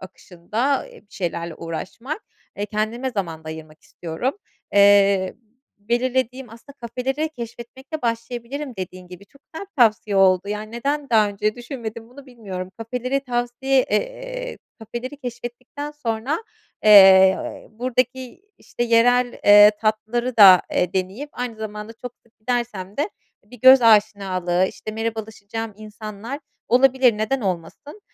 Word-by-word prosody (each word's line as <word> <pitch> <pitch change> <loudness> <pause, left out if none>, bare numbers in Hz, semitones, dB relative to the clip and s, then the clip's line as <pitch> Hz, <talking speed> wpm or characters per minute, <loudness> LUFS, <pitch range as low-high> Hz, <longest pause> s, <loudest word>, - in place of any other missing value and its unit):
akışında, 210 +9 -3
eee, - - -15
bir 205 - -22
şeylerle 170 -2 -4
uğraşmak. 210 - -6 0.3
Eee, 205 +1 -3
kendime 220 +5 -2
zaman 165 -7 -4
da - - -8
ayırmak 155 -1 -10
istiyorum. 175 - -4 0.4
Eee, 200 -1 +5 0.4
belirlediğim 250 +3 -1
aslında 235 +5 -14
kafeleri 260 +6 -3
keşfetmekle 255 +3 -8
başlayabilirim, 240 +3 -4
dediğin 185 -1 -7
gibi 180 +2 -12
çok 280 - -24
güzel 355 +5 -7
bir 400 - -47
tavsiye 215 -2 +2
oldu. 190 0 +4
Yani, 210 +1 -5
neden 280 +4 -2
daha 215 -2 +4
önce 210 +1 -1
düşünmedim 235 -2 -7
bunu, 270 +2 -14
bilmiyorum. 195 -7 -7
Kafeleri 250 +4 -2
tavsiye 250 +1 0
eee, - - -3 0.2
kafeleri 240 +5 -7
keşfettikten 250 +3 -7
sonra, 275 - -3 0.4
eee, 190 -2 +6
buradaki, 255 - -2 0.2
işte, 240 - -5
yerel, 245 +1 +3
eee, 205 0 +9
tatlıları 225 +3 -1
da, 190 -4 +9
eee, 180 0 0
deneyip, 195 +10 -3
aynı 245 -2 -5
zamanda 210 0 -7
çok 245 +1 -9
sık 230 - -33
gidersem 215 -5 -3
de, 290 - +1 0.4
eee, 205 - -31
bir 245 - -13
göz 260 -1 +8
aşinalığı, 195 -5 +3
işte, 215 - -8
merhabalaşacağım 220 0 -5
insanlar 215 +4 -8 0.3
olabilir, 255 -2 +4
neden 250 +5 -1
olmasın. 190 - -5
230 Hz, 130 wpm, -22 LUFS, 200-255 Hz, 0.4 s, eee